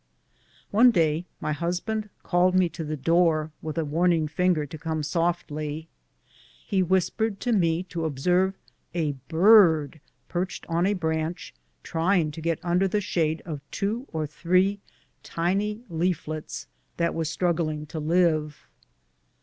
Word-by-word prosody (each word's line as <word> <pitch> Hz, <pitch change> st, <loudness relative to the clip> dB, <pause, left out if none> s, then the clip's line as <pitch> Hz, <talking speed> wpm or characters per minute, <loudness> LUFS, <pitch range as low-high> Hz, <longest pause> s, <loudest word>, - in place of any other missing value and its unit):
One 235 Hz, +5 st, +7 dB
day 165 Hz, -5 st, +1 dB
my -, -, -2 dB
husband 180 Hz, +7 st, -2 dB
called 180 Hz, +1 st, +2 dB
me 185 Hz, -2 st, +4 dB
to 165 Hz, -, -6 dB
the 155 Hz, 0 st, -4 dB
door, 160 Hz, +1 st, +2 dB
with 155 Hz, +1 st, -5 dB
a 165 Hz, -, 0 dB
warning 165 Hz, +1 st, +2 dB
finger 165 Hz, -1 st, +1 dB
to 155 Hz, -, -9 dB
come 160 Hz, -1 st, -2 dB
softly. 160 Hz, -1 st, -2 dB, 0.8 s
He 190 Hz, -, +1 dB
whispered 190 Hz, +4 st, 0 dB
to 245 Hz, -, 0 dB
me 170 Hz, -4 st, +2 dB
to 170 Hz, -2 st, -4 dB
observe 180 Hz, +6 st, +1 dB, 0.4 s
a 160 Hz, -4 st, +1 dB, 0.2 s
bird 165 Hz, -5 st, +5 dB, 0.3 s
perched 180 Hz, +1 st, -3 dB
on 170 Hz, +2 st, +1 dB
a 205 Hz, -, +1 dB
branch, 160 Hz, 0 st, -2 dB
and -, -, -42 dB
trying 165 Hz, -1 st, +1 dB
to 160 Hz, -, -8 dB
get 165 Hz, 0 st, 0 dB
under 180 Hz, +2 st, +2 dB
the 210 Hz, +3 st, 0 dB
shade 160 Hz, -5 st, -1 dB
of 155 Hz, -4 st, -5 dB
two 225 Hz, +7 st, -2 dB
or 160 Hz, -1 st, -2 dB
three 185 Hz, +6 st, +1 dB, 0.4 s
tiny 200 Hz, +6 st, -1 dB
leaflets 160 Hz, -3 st, -3 dB, 0.3 s
that 170 Hz, 0 st, +1 dB
were 165 Hz, -, -1 dB
struggling 160 Hz, -2 st, -1 dB
to 155 Hz, +1 st, -6 dB
live. 155 Hz, -2 st, +1 dB
170 Hz, 140 wpm, -26 LUFS, 155-185 Hz, 0.8 s, One